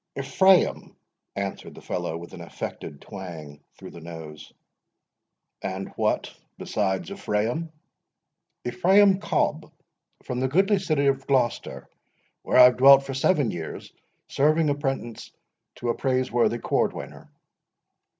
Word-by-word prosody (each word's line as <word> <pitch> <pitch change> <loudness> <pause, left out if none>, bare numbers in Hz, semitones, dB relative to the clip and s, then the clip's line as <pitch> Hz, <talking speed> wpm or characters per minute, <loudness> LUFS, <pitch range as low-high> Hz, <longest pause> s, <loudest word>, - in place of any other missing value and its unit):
"Ephraim," 185 +7 +2 0.4
answered - - -5
the - - -11
fellow, 80 - -4
with 85 +1 -11
an - - -9
affected 70 - -7
twang 85 -8 -9 0.2
through - - -11
the 85 - -12
nose. 80 -2 -10 1.1
"And 95 0 -5
what - - -2 0.2
besides 95 - -2
Ephraim?" 155 - -2 0.9
"Ephraim 190 +7 +4
Cobb, - - -1 0.5
from 125 - -4
the 130 - +1
goodly 195 +8 +2
city 155 -6 0
of 135 -1 0
Glocester, 130 -4 -1 0.6
where - - 0
I 125 - +10
have 125 0 +6
dwelt 135 +1 +7
for 135 - -6
seven 135 - +1
years, 80 -3 -7 0.3
serving 155 +2 +2
apprentice 135 -5 -4 0.4
to 120 - -4
a - - +2
praiseworthy 130 -3 0
cordwainer." - - -3
130 Hz, 120 wpm, -25 LUFS, 95-155 Hz, 1.1 s, I